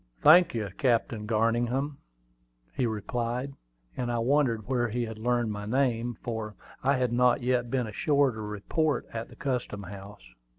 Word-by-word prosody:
"Thank 170 -1 +7
you, 105 -3 -2
Captain 115 -4 +1
Garningham," 120 +5 0 0.7
he 125 - 0
replied: 120 +5 -3 0.4
and 120 -1 -2
I 120 - 0
wondered 120 -3 +2
where 120 -2 +1
he 120 +2 -1
had 110 -1 -7
learned 120 -1 +1
my 105 0 -5
name, 120 -2 0
for 110 -3 -4 0.3
I 135 +1 +2
had 125 -2 0
not 125 +1 +3
yet 125 -1 +1
been 125 -1 0
ashore 140 +5 +2
to 110 -1 -7
report 105 +9 -1
at 115 0 -5
the - - -14
custom 125 -7 -3
house. 95 -9 -11
120 Hz, 160 wpm, -28 LUFS, 110-130 Hz, 0.7 s, Thank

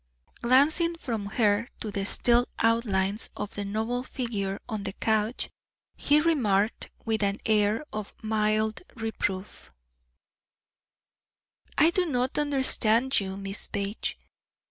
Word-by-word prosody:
Glancing 295 +8 +4
from 225 -10 -4
her 210 +1 +2
to 215 - -4
the 200 -1 -2
still 240 +2 +3
outlines 215 -3 +1
of 205 -1 -4
the 205 - -4
noble 220 +5 -2
figure 210 -7 -3
on 215 -3 -3
the 200 - -4
couch, 220 +2 0 0.5
he 295 +1 +4
remarked 225 -10 +1 0.2
with 220 -1 0
an 200 -1 +1
air 215 +4 +2
of 215 -1 -5
mild 215 0 +1
reproof: 210 -4 -4 2.1
"I 315 +4 +6
do 360 0 +1
not 255 -2 0
understand 265 -3 +3
you, 190 -1 -4
Miss 195 0 -4
Page. 200 +2 -3
220 Hz, 120 wpm, -27 LUFS, 205-250 Hz, 2.1 s, I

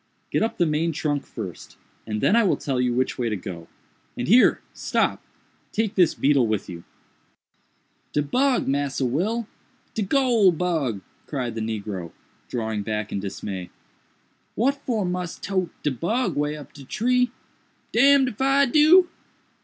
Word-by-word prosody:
"Get - - +1
up 225 - -1
the 175 - +3
main 160 +2 0
trunk 145 -2 -2
first, 95 -7 -8 0.3
and 105 -1 -3
then 210 - +4
I 235 - +5
will 195 - +2
tell 130 -3 -1
you 125 -1 +1
which 130 +2 -1
way 120 -2 0
to 105 - -1
go—and 90 -4 -9
here—stop! 235 +8 +2 0.5
take 220 -1 -1
this 180 -5 +3
beetle 135 -4 +3
with 110 -2 -1
you." 85 -2 -8 1.3
"De 150 - +1
bug, 255 - +1
Massa 140 -1 0
Will!—de 220 - -4
goole 230 -3 +4
bug!" 155 - -1 0.3
cried 125 -5 -3
the 115 - -4
negro, 100 -6 -4 0.4
drawing 110 -3 -2
back 105 0 -3
in - - -2
dismay—"what 100 - -5
for 220 -6 0
mus 180 -1 -3
tote 185 -3 -2
de 150 - +1
bug 185 - -1
way 150 +1 -1
up 145 - -12
de 140 - -11
tree?—d—n 250 - +1
if 235 -1 -6
I 275 +1 +4
do!" 310 +7 +6
150 Hz, 145 wpm, -24 LUFS, -, 1.3 s, do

